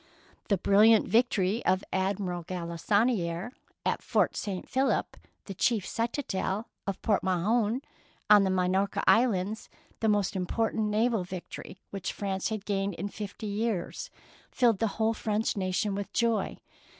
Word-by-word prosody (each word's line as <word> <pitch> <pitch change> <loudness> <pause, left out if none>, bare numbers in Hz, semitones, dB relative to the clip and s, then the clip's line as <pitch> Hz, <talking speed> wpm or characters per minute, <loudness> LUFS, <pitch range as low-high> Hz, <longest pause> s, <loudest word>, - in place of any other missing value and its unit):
The 200 - +2
brilliant 210 +4 +5
victory 220 -3 +2
of 190 +1 +2
Admiral 190 -2 -1
Galissonfere 180 +3 0 0.3
at - - 0
Fort - - +1
St. 195 -4 -4
Philip, 265 +1 0 0.3
the 195 - -6
chief 220 0 +1
citadel 230 -3 -2 0.2
of 195 - -2
Port 210 -3 +2
Mahon 215 +7 +1 0.4
on 210 -1 +7
the 190 - +1
Minorca 190 +2 +1
Islands, 220 -3 +2 0.3
the 220 - +2
most 205 -2 +1
important 220 +4 0
naval 220 0 +1
victory 185 +1 -8
which 195 -2 -4
Prance 195 -2 -2
had 215 -2 -4
gained 195 -2 -1
in 200 - -4
fifty 210 +1 -7
years, 210 - -2 0.4
filled 235 -5 +2
the 225 - +2
whole 225 0 +2
French 215 0 -1
nation 195 +1 0
with 200 0 -4
joy. 230 -2 +1
205 Hz, 140 wpm, -29 LUFS, 190-225 Hz, 0.4 s, on